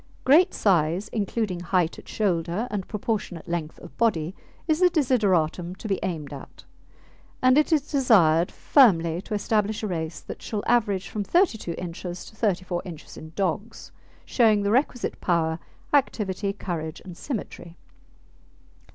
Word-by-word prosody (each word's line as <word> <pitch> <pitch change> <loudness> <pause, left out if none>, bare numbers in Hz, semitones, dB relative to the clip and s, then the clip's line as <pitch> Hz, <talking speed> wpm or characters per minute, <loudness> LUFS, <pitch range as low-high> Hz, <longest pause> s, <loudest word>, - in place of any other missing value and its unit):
Great 310 +7 +5
size, 180 +1 +1
including 205 -3 -2
height 175 -1 0
at - - -15
shoulder 180 +1 -1
and 200 -3 -3
proportionate 205 -5 -3
length 170 -2 -3
of 175 - -12
body, 180 -7 +1 0.3
is 315 -1 +2
the 365 -1 +6
desideratum 190 - +1
to 215 - -8
be 195 -2 0
aimed 155 -6 -4
at, 140 - -11 0.8
and 255 0 +5
it 300 +2 +3
is 300 -2 +1
desired 180 - +4
firmly 170 - +4
to 210 - -4
establish 210 +1 0
a - - 0
race 165 -3 -4
that - - -9
shall 210 -2 -4
average 205 -6 +1
from 210 - -3
32 220 - +1
inches 175 0 -6
to 220 - -14
34 185 -5 -1
inches 165 -4 -10
in 155 - -10
dogs, 200 +4 -3 0.3
showing 215 -4 +3
the 200 - +1
requisite 250 0 0
power, 165 -2 +1 0.3
activity, 205 -8 +1
courage, 170 -6 -5
and 180 -2 -9
symmetry. 175 - -6
195 Hz, 145 wpm, -25 LUFS, 170-225 Hz, 0.8 s, the